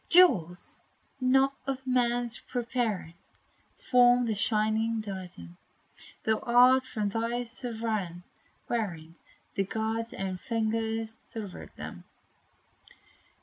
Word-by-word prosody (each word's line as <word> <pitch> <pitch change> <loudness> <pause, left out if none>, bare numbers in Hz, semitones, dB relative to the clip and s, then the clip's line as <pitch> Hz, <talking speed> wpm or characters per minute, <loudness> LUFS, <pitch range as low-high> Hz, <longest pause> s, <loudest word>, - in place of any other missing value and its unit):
Jewels, 195 - +4 0.4
not 265 +1 +4
of 265 -1 -3
man's 245 -2 +1
preparing, 235 -8 -2 0.6
Form 245 - +5
the 225 - 0
shining 220 +1 +1
diadem, 185 - -7 0.7
Thou 220 0 +2
art 250 +2 +5
from 210 -2 -1
thy 230 +3 -1
Sovereign 225 -7 -3 0.4
wearing: 170 -9 -3 0.6
God's 225 +1 -2
own 190 -1 -3
finger 225 +1 -1
silvered 220 -2 -8
them. - - -8
225 Hz, 90 wpm, -29 LUFS, 210-245 Hz, 0.7 s, Form